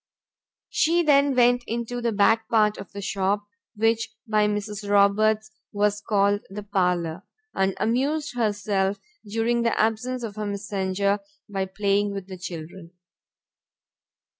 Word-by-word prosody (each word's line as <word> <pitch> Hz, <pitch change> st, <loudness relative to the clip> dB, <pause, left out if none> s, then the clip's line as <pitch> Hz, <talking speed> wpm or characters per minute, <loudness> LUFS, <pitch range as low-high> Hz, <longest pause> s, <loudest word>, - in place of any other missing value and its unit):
She 340 Hz, +2 st, +3 dB
then 280 Hz, -3 st, +4 dB
went 245 Hz, 0 st, +4 dB
into 235 Hz, +1 st, -3 dB
the 235 Hz, -1 st, 0 dB
back 220 Hz, +2 st, +3 dB
part 215 Hz, -2 st, +3 dB
of 195 Hz, -, -9 dB
the 200 Hz, 0 st, -7 dB
shop, 200 Hz, +1 st, 0 dB, 0.3 s
which 225 Hz, +1 st, +1 dB
by 215 Hz, -2 st, +2 dB
Mrs. 210 Hz, 0 st, -3 dB
Roberts 215 Hz, +2 st, +3 dB, 0.2 s
was 205 Hz, 0 st, +1 dB
called 205 Hz, -1 st, +2 dB
the 205 Hz, +2 st, -7 dB
parlour, 180 Hz, -4 st, 0 dB, 0.3 s
and 190 Hz, 0 st, +1 dB
amused 280 Hz, +5 st, 0 dB
herself 205 Hz, -3 st, 0 dB, 0.3 s
during 225 Hz, +3 st, 0 dB
the 230 Hz, -1 st, 0 dB
absence 235 Hz, +3 st, 0 dB
of 215 Hz, -2 st, -6 dB
her 215 Hz, -, -3 dB
messenger, 200 Hz, 0 st, -1 dB, 0.3 s
by 195 Hz, -2 st, -2 dB
playing 200 Hz, +1 st, 0 dB
with 195 Hz, -2 st, -5 dB
the 190 Hz, -1 st, -9 dB
children. 170 Hz, 0 st, -8 dB
210 Hz, 135 wpm, -25 LUFS, 200-225 Hz, 0.3 s, then